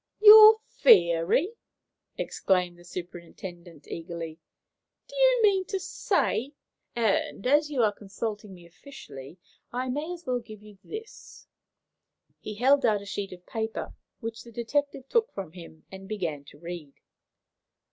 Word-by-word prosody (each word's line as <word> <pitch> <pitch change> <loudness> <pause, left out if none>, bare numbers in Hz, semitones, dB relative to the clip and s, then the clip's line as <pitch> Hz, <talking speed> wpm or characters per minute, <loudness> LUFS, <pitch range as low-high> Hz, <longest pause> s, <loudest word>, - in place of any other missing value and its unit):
"Your 435 +1 +10
theory!" 225 - +4 0.6
exclaimed 180 -2 0
the - - -15
superintendent, 175 -1 -9
eagerly. 165 -1 -7 0.7
"Do - - -13
you - - +4
mean 390 -3 +4
to 390 - -3
say 280 -6 -1 0.2
?" - - -52
"And, 220 -3 0
as 295 +3 +3
you 265 -5 +1
are 215 - +3
consulting 210 +1 -6
me 175 -1 -15
officially, 165 - -12 0.3
I 255 +1 -3
may 295 +6 -3
as 350 -1 -8
well 250 -2 0
give 215 -3 -13
you 210 -2 -15
this." 445 +3 -10 0.9
He 210 - -7
held 270 +5 +3
out 210 -3 +2
a - - -12
sheet 200 0 -5
of 180 -1 -12
paper, 220 0 -4 0.3
which 225 -1 -6
the 235 - -13
detective 270 +4 -2
took 465 - +1
from 190 -5 -6
him 165 -2 -13
and 190 0 -10
began 165 -9 -4
to 145 - -15
read. 165 -3 -8
215 Hz, 145 wpm, -27 LUFS, 175-285 Hz, 0.9 s, Your